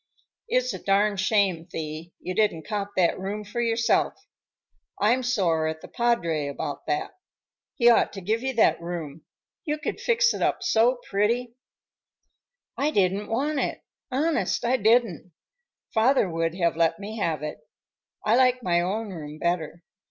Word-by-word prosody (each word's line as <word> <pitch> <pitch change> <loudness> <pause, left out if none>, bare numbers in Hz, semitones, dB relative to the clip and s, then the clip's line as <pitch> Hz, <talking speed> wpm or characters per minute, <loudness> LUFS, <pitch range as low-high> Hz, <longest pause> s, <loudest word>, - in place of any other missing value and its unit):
"It's - - +1
a - - -6
darned 200 0 +2
shame, 190 -4 +1
Thee, 155 +2 -6
you 185 - -5
didn't 180 -7 0
cop 205 -1 -3
that 180 -1 +2
room 200 +3 -4
for 210 +4 -4
yourself. 230 -1 +1 0.8
I'm 235 +5 +3
sore 180 -10 +1
at 160 0 -4
the - - -10
padre 170 -11 0
about 145 +1 -5
that. 150 -1 -1 0.6
He 240 - +3
ought 240 - +5
to 200 - -6
give 220 +5 -1
you 265 +1 -1
that 225 - +3
room. 165 -3 -6 0.4
You 300 -3 -2
could - - -4
fix 475 0 +3
it - - -5
up 375 - 0
so 245 -7 +3
pretty." 230 +4 0 1.2
"I 290 - +1
didn't 200 -4 +1
want 280 +6 -1
it, - - -2 0.3
honest 290 -1 0
I 250 +2 +3
didn't. 220 - +2 0.6
Father 235 0 +3
would 165 0 -1
have 170 -3 +1
let 165 0 +2
me 215 +3 -7
have 160 -6 -1
it. 150 0 -5 0.7
I 215 - +4
like 255 -1 +3
my 175 -1 +2
own 205 +5 -2
room 150 -4 -8
better. 170 0 -2
205 Hz, 160 wpm, -25 LUFS, 170-240 Hz, 1.2 s, ought